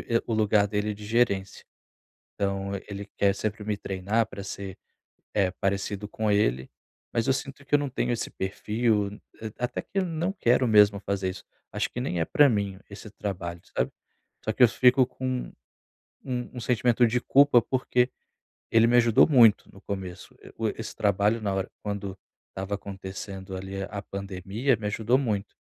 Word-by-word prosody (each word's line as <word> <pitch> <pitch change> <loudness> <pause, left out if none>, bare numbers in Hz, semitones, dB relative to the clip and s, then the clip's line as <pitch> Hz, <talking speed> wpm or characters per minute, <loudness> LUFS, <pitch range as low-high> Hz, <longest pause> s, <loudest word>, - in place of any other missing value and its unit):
e 115 - +3
o 115 - -1
lugar 105 -1 +3
dele 105 +1 -1
de 105 0 -10
gerência. 105 -4 0 0.7
Então 100 0 -2 0.2
ele 100 0 -5
quer 100 -1 +3
sempre 105 +1 -3
me 105 -1 -2
treinar 100 +4 0
para 100 -3 -8
ser, 100 -1 -6 0.6
eh, 100 -3 +3
parecido 100 +1 -1
com 110 0 -1
ele, 65 -11 +1 0.4
mas 115 - 0
eu - - +4
sinto 135 +2 -5
que 145 - 0
eu - - +7
não 145 -2 -2
tenho 120 - -1
esse 115 - -3
perfil. 105 +1 -1 0.4
Até 125 -1 -2
que 195 - -5
eu 190 - +2
não 170 +3 -1
quero 125 - +2
mesmo 105 -2 +6
fazer 100 -2 -2
isso. 95 - -9 0.3
Acho - - -1
que 125 - -5
nem 90 -9 -2
é - - +2
para 145 - +5
mim 100 -4 -1
esse 100 +1 -10
trabalho, 85 -5 -5 0.2
sabe? - - +1 0.5
Só - - 0
que - - +1
eu 120 - +9
fico 125 +2 +5
com 130 0 -4 0.7
um 125 -1 -2
um - - -4
sentimento 120 0 +3
de 120 +2 +1
culpa, 140 -4 +5
porque 125 -1 +1 0.6
ele 115 0 +5
me 120 - +4
ajudou 115 -2 +6
muito 120 -8 +5
no 95 - -15
começo. 95 -3 -6 0.2
O 110 -1 +1
e - - -3
esse 110 -1 -6
trabalho, 105 +2 +2
na 100 -2 -1
hora 95 - -2
quando 100 -2 -4 0.3
estava 95 +2 -4
acontecendo 95 -1 -7
ali 95 +1 -5
a 100 -1 -5
pandemia, 100 +6 -2
me 105 - -6
ajudou 110 +4 +2
muito. 105 -6 -2
105 Hz, 180 wpm, -27 LUFS, 100-120 Hz, 0.7 s, eu